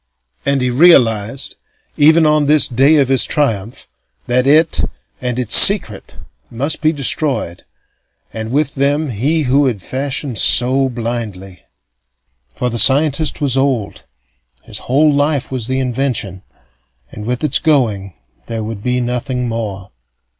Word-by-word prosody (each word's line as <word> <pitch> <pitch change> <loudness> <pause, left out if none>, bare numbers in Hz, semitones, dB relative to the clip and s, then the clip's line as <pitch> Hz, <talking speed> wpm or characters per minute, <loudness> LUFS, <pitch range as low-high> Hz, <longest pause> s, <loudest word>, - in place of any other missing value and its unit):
And 140 -1 0
he 125 0 -1
realized 125 -5 +2 0.4
even 160 +2 +4
on 150 -1 +1
this 150 0 +4
day 135 +5 +2
of 140 -3 +2
his 135 -2 +3
triumph 115 -7 -3 0.4
that 125 +2 0
it 155 +3 +2 0.4
and 125 -1 -3
its 120 -3 +1
secret 185 - +5 0.3
must 140 +8 -3
be 155 -1 +2
destroyed, 135 - -2 0.7
and 110 0 -6
with 145 +1 -1
them 145 +1 -1
he 145 +9 -1
who 140 +2 +1
had 105 -8 -4
fashioned 135 -3 -4
so 130 +2 +3
blindly. 110 -7 -7 0.9
For 125 -1 -3
the 120 - -3
scientist 150 +4 +2
was 135 -3 +1
old, 135 -6 -2 0.6
his - - -7
whole 150 +3 +3
life 145 -1 -1
was 125 -4 -3
the 130 0 -2
invention, 125 -7 -3 0.7
and 105 0 -9
with 125 +3 -3
its 150 - +2
going 110 - -1 0.3
there 115 -2 -5
would 110 -1 -7
be 125 +2 -2
nothing 125 +1 -3
more. 105 -5 -6
130 Hz, 140 wpm, -15 LUFS, 115-145 Hz, 0.9 s, secret